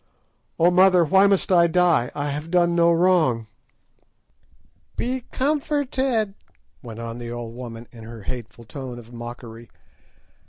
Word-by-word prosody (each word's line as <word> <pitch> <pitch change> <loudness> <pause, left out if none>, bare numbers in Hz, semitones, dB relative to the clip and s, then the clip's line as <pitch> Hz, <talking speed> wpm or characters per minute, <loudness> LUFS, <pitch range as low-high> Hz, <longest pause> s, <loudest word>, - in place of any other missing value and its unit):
Oh, 170 +2 +4
mother, 180 -1 +5
why 190 +5 +5
must 195 -1 +1
I 170 -2 +5
die? 170 -7 +2
I 145 0 -2
have 150 +3 -5
done 175 -1 +3
no 170 0 +4
wrong!" 165 -10 +2 1.5
"Be 250 0 -3
comforted," 270 -6 0 0.5
went 115 -3 -9
on 115 0 -6
the 120 -1 -6
old 120 -1 -6
woman 120 -1 -9
in 115 -2 -12
her 115 -1 -10
hateful 120 +1 -7
tone 130 +1 -8
of 120 0 -13
mockery. 120 -1 -9
150 Hz, 135 wpm, -23 LUFS, 120-185 Hz, 1.5 s, mother